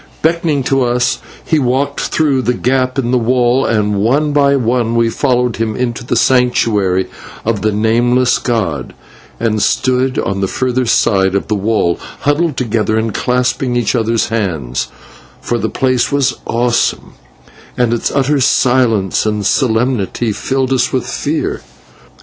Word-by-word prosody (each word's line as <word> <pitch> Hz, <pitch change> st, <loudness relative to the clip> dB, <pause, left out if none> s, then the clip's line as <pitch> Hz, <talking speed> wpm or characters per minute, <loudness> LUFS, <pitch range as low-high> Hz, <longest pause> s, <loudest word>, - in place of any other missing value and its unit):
Beckoning 160 Hz, -3 st, +1 dB
to 135 Hz, +1 st, +1 dB
us 125 Hz, +1 st, +1 dB, 0.3 s
he 160 Hz, -, +1 dB
walked 130 Hz, +1 st, 0 dB
through 145 Hz, -4 st, +1 dB
the 125 Hz, 0 st, 0 dB
gap 130 Hz, +1 st, 0 dB
in 125 Hz, -3 st, 0 dB
the 125 Hz, -, +3 dB
wall, 125 Hz, +2 st, +2 dB
and 105 Hz, -2 st, 0 dB
one 145 Hz, +7 st, +1 dB
by 140 Hz, -1 st, +3 dB
one 120 Hz, -2 st, 0 dB
we 115 Hz, -1 st, +2 dB
followed 125 Hz, -2 st, 0 dB
him 110 Hz, -1 st, -2 dB
into 125 Hz, 0 st, -3 dB
the 120 Hz, -, -2 dB
Sanctuary 105 Hz, -7 st, +2 dB, 0.4 s
of 110 Hz, -2 st, 0 dB
the 110 Hz, -, +1 dB
Nameless 120 Hz, +4 st, +2 dB
god, 95 Hz, -, -2 dB, 0.4 s
and 110 Hz, -2 st, 0 dB
stood 130 Hz, +3 st, +1 dB
on 100 Hz, 0 st, -1 dB
the 95 Hz, -, +1 dB
further 130 Hz, +3 st, -1 dB
side 95 Hz, -4 st, +2 dB
of 100 Hz, -, -2 dB
the -, -, +1 dB
wall, 105 Hz, -4 st, 0 dB, 0.2 s
huddled 145 Hz, +1 st, 0 dB
together 110 Hz, -3 st, 0 dB
and 110 Hz, -1 st, -1 dB
clasping 125 Hz, +1 st, 0 dB
each 120 Hz, -3 st, 0 dB
other's 115 Hz, -2 st, 0 dB
hands, 80 Hz, -, -2 dB, 0.5 s
for 120 Hz, -, -2 dB
the -, -, -1 dB
place 130 Hz, -1 st, 0 dB
was 140 Hz, -3 st, +1 dB
awesome, 120 Hz, +1 st, 0 dB, 0.6 s
and 120 Hz, -2 st, +2 dB
its 120 Hz, -, -1 dB
utter 140 Hz, +1 st, +1 dB
silence 120 Hz, -7 st, +2 dB
and 105 Hz, -1 st, -1 dB
solemnity 120 Hz, -1 st, 0 dB
filled 135 Hz, +4 st, -1 dB
us 130 Hz, -, +1 dB
with -, -, -1 dB
fear. -, -, -2 dB
120 Hz, 150 wpm, -15 LUFS, 110-130 Hz, 0.6 s, the